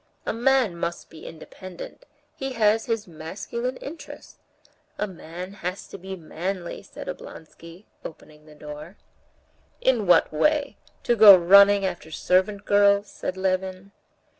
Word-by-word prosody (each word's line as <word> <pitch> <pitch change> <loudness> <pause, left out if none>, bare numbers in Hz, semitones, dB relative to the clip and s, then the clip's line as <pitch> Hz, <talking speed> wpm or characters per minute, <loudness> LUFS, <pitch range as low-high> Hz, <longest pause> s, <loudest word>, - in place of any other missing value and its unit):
A - - -2
man 240 -5 +1
must 170 0 -5
be 160 - -12
independent; 185 - -11 0.3
he 270 -1 -5
has 220 -1 +2
his 225 -2 -2
masculine 195 +10 -6
interests. 315 +4 -11 0.6
A - - -1
man 180 0 -9
has 185 -1 -6
to - - -9
be 190 +1 -7
manly," 175 +2 -5
said - - -11
Oblonsky, 165 +4 -11 0.2
opening 155 -1 -12
the 150 - -15
door. 150 +4 -10 0.8
"In 240 -7 +1
what 175 - +4
way? 285 - +1 0.3
To 240 - +2
go 205 -3 +10
running 200 +3 +6
after 175 -4 -5
servant 190 +5 0
girls?" 205 0 +3
said 185 - -5
Levin. 190 +1 -2
190 Hz, 135 wpm, -24 LUFS, 170-210 Hz, 0.8 s, go